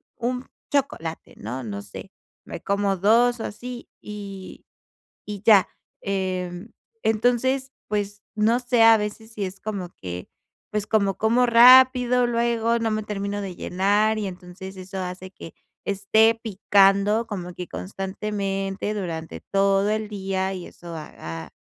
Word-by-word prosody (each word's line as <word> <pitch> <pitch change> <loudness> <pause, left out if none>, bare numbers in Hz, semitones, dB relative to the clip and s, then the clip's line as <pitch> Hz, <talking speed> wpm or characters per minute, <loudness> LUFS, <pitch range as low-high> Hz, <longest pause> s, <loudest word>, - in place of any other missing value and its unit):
un 250 +1 -3 0.3
chocolate, 255 - -2
¿no?, 125 +5 -5
no 100 -3 -5
sé, 100 - -10 0.3
me - - -7
como 200 -1 0
2 235 +5 +4
o - - -3
así, 245 +3 -7
y 200 -2 -8 0.6
y 205 -2 -6
ya. 205 -4 +6 0.3
Em, 185 +1 -3 0.3
entonces, 245 +4 +1 0.2
pues, 205 0 -3
no 220 +3 +3
sé, 245 -2 +1
a 225 0 +8
veces 215 +2 -5
si 210 -3 -3
es 185 +1 -7
como 200 -5 -4
que, 90 -1 -7 0.4
pues, 210 -1 -2
como, 200 -3 +2
como 235 +3 +3
rápido, 250 +1 +7
luego 235 -1 +1
no 225 -1 0
me 215 0 -1
termino 205 0 -3
de 190 -3 -6
llenar, 205 +5 +1
y 210 - -2
entonces, 185 +1 -9
eso 190 +1 -8
hace 185 0 -5
que 165 - -11 0.3
esté 205 +3 +3
picando 200 +1 +3
como 180 -4 -5
que 180 0 -7
constantemente 195 +1 -3
durante 165 -5 -5
todo 195 0 +3
el 215 0 -2
día. 190 -2 -2
Y 180 - -7
eso 170 -1 -10
haga, 80 - -8
205 Hz, 140 wpm, -24 LUFS, 190-225 Hz, 0.6 s, a